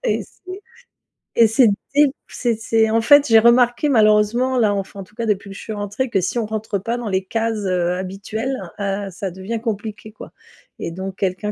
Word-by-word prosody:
Et - - 0
c'est 370 - -26 0.9
et 230 -1 +6
c'est 225 +2 +4 0.3
dès 295 +1 +7
p 270 - -5
c'est 240 -3 -1
c'est, 225 -1 +2
en 225 +1 +2
fait, 285 +5 +6
j'ai 225 -1 +7
remarqué 245 +4 +4
malheureusement, 225 +2 +3
là, 215 -3 +3
enfin, 195 0 -5
en - - -5
tout 210 +3 -21
cas, 230 0 -3
depuis 200 -2 -1
que 195 - -9
je - - -9
suis 220 - -6
rentrée 205 +5 -3
que 195 - +2
si 210 - -2
on 230 - 0
rentre 215 -1 -3
pas 230 +5 -3
dans 240 -3 -4
les 190 -1 0
cases, 225 0 -2
heu, 180 -1 0
habituelles, 200 +7 -4 0.2
heu, 200 0 -2
ça 190 0 -5
devient 190 +5 -5
compliqué, 215 -1 -5
quoi, - - -12 0.5
et - - -5
donc 190 +2 -6
quelqu'un 195 +2 -2
215 Hz, 215 wpm, -20 LUFS, 195-230 Hz, 0.9 s, dès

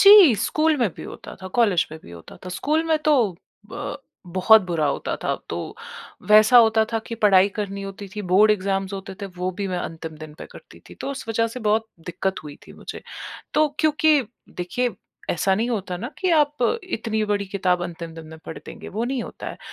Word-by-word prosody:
जी 395 - +10
school 310 +9 +2
में 240 -5 +2
भी - - -8
होता - - -9
था, 185 - -5
कॉलेज 200 -5 +2
में 160 - -7
भी - - -12
होता 85 -1 -12
था। 185 - -6
स्कूल 310 +3 +1
में 320 -1 +2
तो 240 -11 +3 0.4
ब 290 0 -5 0.3
बहुत 190 +4 +5
बुरा 165 -4 0
होता - - -1
था। - - 0
तो - - -5 0.6
वैसा 215 +3 +8
होता 220 -1 +5
था 225 - +2
कि 230 - -4
पढ़ाई 200 -2 +5
करनी 200 -1 -3
होती 195 0 -7
थी 210 - -4
बोर्ड 210 +3 +6
एग्ज़ाम्स 195 -1 0
होते 195 0 -6
थे - - -2
वो 180 +1 -1
भी 200 - -1
मैं 180 - -2
अंतिम 160 -2 -6
दिन 155 -1 -10
पे - - -8
करती - - -14
थी। - - -11
तो - - -3
उस 275 -3 -6
वज़ह 230 0 +1
से 250 +2 -7
बहुत 220 +1 +1 0.2
दिक्कत 190 +1 -2
हुई 145 -1 -9
थी - - -12
मुझे। - - -9 0.5
तो 305 0 +5
क्योंकि 310 -1 +4 0.4
देखिए 245 +8 -1 0.4
ऐसा 190 +3 +2
नहीं 230 +4 -1
होता 195 -5 -2
ना 235 +9 -5
कि 370 -2 +1
आप 295 0 +1 0.3
इतनी 220 -10 -2
बड़ी 205 -1 -1
किताब 185 -2 0
अंतिम 170 -1 -7
दिन 165 -1 -10
में 160 0 -11
पढ़ 160 - -6
देंगे, - - -9
वो 220 +4 -2
नहीं 255 -1 -2
होता - - -8
हैं। - - -9
210 Hz, 215 wpm, -23 LUFS, 185-245 Hz, 0.6 s, जी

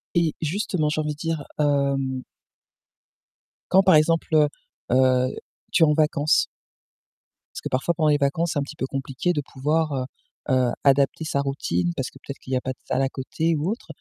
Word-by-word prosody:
Et 170 -2 +2
justement 165 -1 0
j'ai 155 +1 0
envie 150 0 -2
de 150 - -7
dire, 165 -2 -2 0.2
hem 140 -3 +1 1.5
quand 190 +1 +6
par 185 -3 +6
exemple, 165 +2 +3
heu, 150 -1 +6 0.4
heu, 130 0 +4 0.4
tu 180 - +4
es - - +8
en 150 - +3
vacances 150 -1 +2 1.1
parce - - -6
que - - -4
parfois 130 +7 0
pendant 155 -1 +2
les 145 - +4
vacances, 145 +4 0
c'est - - 0
un - - 0
petit 150 +2 -9
peu 130 - -2
compliqué 135 +5 -2
de 160 - -1
pouvoir, 150 +3 0
heu, 130 -2 -1 0.5
heu, 125 -2 +3
adapter 140 +2 +3
sa 155 -3 -1
routine 90 -11 -1
parce 130 - -3
que - - -16
peut-être 140 - -8
qu'il 130 - -10
y - - +3
a - - -2
pas 130 - -3
de - - -29
salle 130 +1 0
à 135 - +2
côté 160 +5 -1
ou 155 +6 -1
autre. 230 - -6
145 Hz, 200 wpm, -24 LUFS, 135-160 Hz, 1.5 s, es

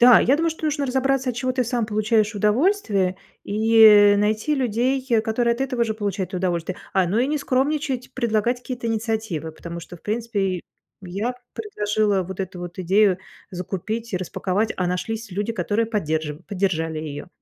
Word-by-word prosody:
Да, 245 -1 +9
я 275 +3 +4
думаю, 330 +1 +1
что 320 0 -7
нужно 290 -2 0
разобраться, 265 0 +1
от 240 - -8
чего 255 +1 -1
ты 255 0 +1
сам 240 -2 -1
получаешь 215 0 +1
удовольствие 210 - +2 0.3
и, 220 +2 +1
э, 205 -1 +8
найти 215 +8 +1
людей, 255 +1 0 0.2
которые 235 +1 +1
от 240 - -10
этого 250 -3 0
же 220 -1 -2
получают 200 -3 -3
удовольствие. 180 -1 -1 0.2
А, 190 -2 +3
ну 195 +6 0
и 250 - +3
не 300 +1 0
скромничать, 275 -1 -1
предлагать 235 0 +1
какие-то 245 -2 -5
инициативы. 220 -8 -2
Потому 170 +2 -8
что, 175 +1 -10
в - - -23
принципе, 205 -5 -1 0.4
я 200 +7 -3 0.2
предложила 210 - 0
вот 190 +1 -6
эту 190 -1 -5
вот 175 +1 -8
идею 190 +1 +3 0.3
закупить 195 +5 -4
и - - +1
распаковать, 185 +4 -1
а 180 - 0
нашлись 220 +5 -3
люди, 205 +5 -2
которые 215 +3 0
поддерж 155 -8 -2
поддержали 165 -5 -1
ее. 150 +1 -6
215 Hz, 170 wpm, -23 LUFS, 185-245 Hz, 0.4 s, Да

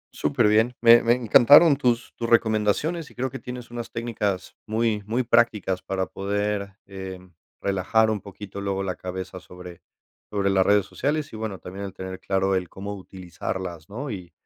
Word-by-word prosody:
Superbién, 110 +4 +2
me 115 0 +7
me 115 - +4
encantaron 140 +6 +7
tus 120 -4 0
tus 115 - -3
recomendaciones 115 - +1
y - - -19
creo 130 +1 -2
que - - -6
tienes 125 -1 -8
unas 120 -1 -6
técnicas 105 -5 -3
muy 110 -1 0
muy 120 +4 0
prácticas 115 -6 +2
para 95 -1 -2
poder, 100 0 -2
eh, 95 -1 -7 0.4
relajar 105 +3 +2
un 105 -3 -2
poquito 100 0 -9
luego 95 -1 -2
la 95 -1 -2
cabeza 95 0 -6
sobre 90 -1 -12 0.5
sobre 100 -1 0
las 95 -1 +3
redes 100 -1 +4
sociales, 145 0 -2
y - - -6
bueno, 110 -3 -4
también 95 +2 -8
el 95 - -7
tener 95 0 -7
claro 95 0 0
el 90 -2 -2
cómo 100 +1 -6
utilizarlas, 90 -2 -6
¿no?, 130 +6 -5
y 90 -4 -7
105 Hz, 170 wpm, -24 LUFS, 95-115 Hz, 0.5 s, me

